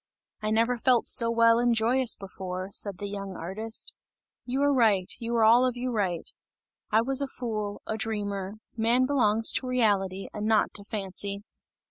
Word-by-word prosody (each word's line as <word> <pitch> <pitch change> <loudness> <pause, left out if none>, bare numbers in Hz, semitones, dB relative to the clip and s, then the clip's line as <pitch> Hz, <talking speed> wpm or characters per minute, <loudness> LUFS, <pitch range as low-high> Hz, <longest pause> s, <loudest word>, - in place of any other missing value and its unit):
"I 215 - -2
never 230 +3 +1
felt 245 -1 +3
so 230 -1 +3
well 230 0 +4
and 240 -1 +2
joyous 240 +3 +3
before!" 185 -1 -6
said 200 -2 -2
the 205 - -6
young 200 -1 -6
artist. 215 +7 -3 0.5
"You 265 +3 -1
are 285 0 +3
right, 210 -8 +3
you 235 0 -3
are 230 - +3
all 230 +3 +6
of 250 -1 0
you 250 +1 -2
right. 190 -7 -1 0.6
I 220 +1 +4
was 270 +3 +2
a 280 - -1
fool, 215 -6 -5
a 220 - -3
dreamer; 205 -3 -3 0.2
man 235 +3 +2
belongs 225 -5 +3
to 255 - 0
reality 200 -6 0
and 210 0 -3
not 220 -1 +2
to 200 - -5
fancy!" 200 -1 -5
220 Hz, 175 wpm, -27 LUFS, 200-240 Hz, 0.6 s, all